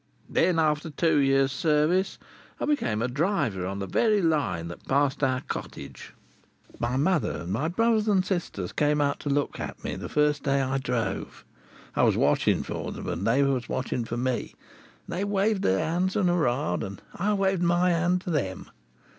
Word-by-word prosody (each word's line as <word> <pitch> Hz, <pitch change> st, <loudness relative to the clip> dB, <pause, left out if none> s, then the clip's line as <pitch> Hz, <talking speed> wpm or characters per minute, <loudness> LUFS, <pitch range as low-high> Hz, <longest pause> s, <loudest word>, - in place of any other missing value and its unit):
Then, 180 Hz, -2 st, +3 dB
after 155 Hz, 0 st, +1 dB
two 160 Hz, 0 st, +2 dB
years' 135 Hz, -1 st, +3 dB
service, 155 Hz, +7 st, +1 dB, 0.4 s
I -, -, -1 dB
became 115 Hz, -, 0 dB
a -, -, +1 dB
driver 135 Hz, -, 0 dB
on 100 Hz, +1 st, -4 dB
the 100 Hz, -, -3 dB
very 210 Hz, -, +2 dB
Line 140 Hz, -, 0 dB
which 85 Hz, -, -9 dB
passed 140 Hz, +1 st, +1 dB
our 130 Hz, -1 st, +2 dB
cottage. -, -, -7 dB, 0.6 s
My 120 Hz, +2 st, -1 dB
mother 145 Hz, -, +1 dB
and 85 Hz, +2 st, -5 dB
my 135 Hz, +9 st, 0 dB
brothers 220 Hz, +4 st, +2 dB
and 190 Hz, -3 st, +3 dB
sisters 165 Hz, -, -3 dB
came 150 Hz, 0 st, +1 dB
out 140 Hz, -1 st, +1 dB
to 145 Hz, -, -4 dB
look 140 Hz, 0 st, 0 dB
at -, -, -6 dB
me, -, -, -3 dB
the -, -, -6 dB
first 150 Hz, 0 st, +2 dB
day 140 Hz, 0 st, +1 dB
I 135 Hz, 0 st, 0 dB
drove. 125 Hz, -3 st, -3 dB, 0.5 s
I -, -, +2 dB
was -, -, +3 dB
watching -, -, +2 dB
for -, -, -5 dB
them -, -, -7 dB
and 85 Hz, +5 st, -2 dB
they 130 Hz, +5 st, +4 dB
was 130 Hz, -4 st, 0 dB
watching 125 Hz, -1 st, -2 dB
for 115 Hz, +1 st, -4 dB
me, 125 Hz, 0 st, -2 dB, 0.5 s
and 170 Hz, -, -4 dB
they -, -, 0 dB
waved 200 Hz, 0 st, +1 dB
their 95 Hz, +1 st, +2 dB
hands 180 Hz, +3 st, 0 dB
and 185 Hz, -4 st, +2 dB
hoora'd, 150 Hz, -4 st, +1 dB
and 95 Hz, -1 st, -6 dB
I 205 Hz, +3 st, 0 dB
waved 195 Hz, -2 st, +1 dB
my 175 Hz, +1 st, +3 dB
hand 175 Hz, +1 st, +1 dB
to 180 Hz, -, -4 dB
them. 95 Hz, -, -2 dB
150 Hz, 190 wpm, -26 LUFS, 125-180 Hz, 0.6 s, they